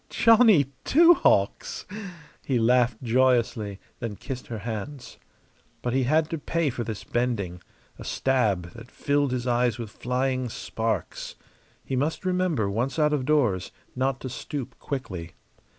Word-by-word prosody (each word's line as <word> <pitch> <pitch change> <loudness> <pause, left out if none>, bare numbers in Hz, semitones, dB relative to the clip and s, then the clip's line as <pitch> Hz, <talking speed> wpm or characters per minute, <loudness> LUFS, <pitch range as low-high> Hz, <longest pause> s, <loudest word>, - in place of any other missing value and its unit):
"Johnny 220 - +5
Two 340 +4 +7
Hawks!" 100 - +1 0.6
He 130 - 0
laughed 120 0 +2
joyously, 115 -4 +2 0.2
then 115 -4 -4
kissed 130 +3 -7
her 115 - -5
hands. 120 +5 -6 0.6
But 120 - -1
he 130 -1 +2
had 155 +4 +3
to 165 - -2
pay 165 -1 0
for 120 - -3
this 110 -3 -5
bending 105 -8 -2 0.4
a - - -7
stab 105 -10 0
that 115 +1 -12
filled 145 -1 0
his 125 -1 -2
eyes 120 -2 +2
with 115 -3 -6
flying 130 +1 -1
sparks. 110 -4 -3 0.5
He 135 - -2
must 150 +8 -1
remember, 180 - +1
once 120 +7 -1
out 150 -1 +3
of 135 -4 0
doors, 125 -12 +1 0.2
not 130 0 0
to 130 - -4
stoop 130 0 -6
quickly. 95 - -5
125 Hz, 145 wpm, -26 LUFS, 115-140 Hz, 0.6 s, Two